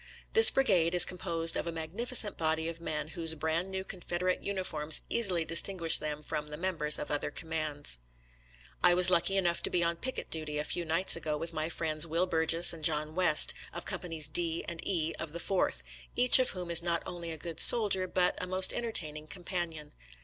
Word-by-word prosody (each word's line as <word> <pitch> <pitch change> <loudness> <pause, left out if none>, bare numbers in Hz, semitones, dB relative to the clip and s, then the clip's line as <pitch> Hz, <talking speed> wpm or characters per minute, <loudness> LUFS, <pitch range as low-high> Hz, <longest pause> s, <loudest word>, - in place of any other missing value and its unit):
This 450 0 +9
brigade 180 -11 +1
is 175 - +10
composed 170 -2 -1
of - - -4
a - - -3
magnificent 205 +8 0
body 160 0 -2
of 165 0 -8
men 150 -2 -5
whose 165 -1 0
brand 160 +3 -3
new 190 0 -6
Con 185 -1 -10
federate 180 +2 -3
uniforms 160 -6 +1
easily 185 -8 +1
distinguish 170 0 +2
them 150 0 -6
from 150 0 -6
the 150 0 -9
members 160 -4 +1
of - - -7
other 145 - -2
commands. 155 - -5 0.8
I 175 0 +5
was 180 0 +7
lucky 180 +3 +1
enough 175 -3 -1
to - - -3
be 175 - 0
on 170 0 -2
picket 260 +8 -6
duty 155 -2 -5
a 150 - -2
few 170 +3 -3
nights 165 +4 +3
ago 150 -1 -4
with 165 +2 -5
my 155 0 -4
friends 160 -1 +1
Will 165 +3 -1
Burges 165 0 +4
and 160 -2 -11
John 155 0 0
West, 180 -3 +2 0.2
of 175 - -8
Companies 165 -4 -4
D 165 +1 -2
and 170 -1 -6
E 165 -4 -2
of 160 -2 -7
the 170 - -7
Fourth, 170 - -2 0.3
each 250 +1 +6
of 255 - +1
whom 180 -2 -6
is 170 - +6
not 170 -1 -2
only 170 -1 -8
a 160 - -7
good 165 +1 -8
soldier, 200 -5 +4
but 180 0 -1
a - - -5
most 185 +1 +2
entertaining 155 -10 -3
companion. 175 -4 -6
170 Hz, 200 wpm, -29 LUFS, 160-180 Hz, 0.8 s, is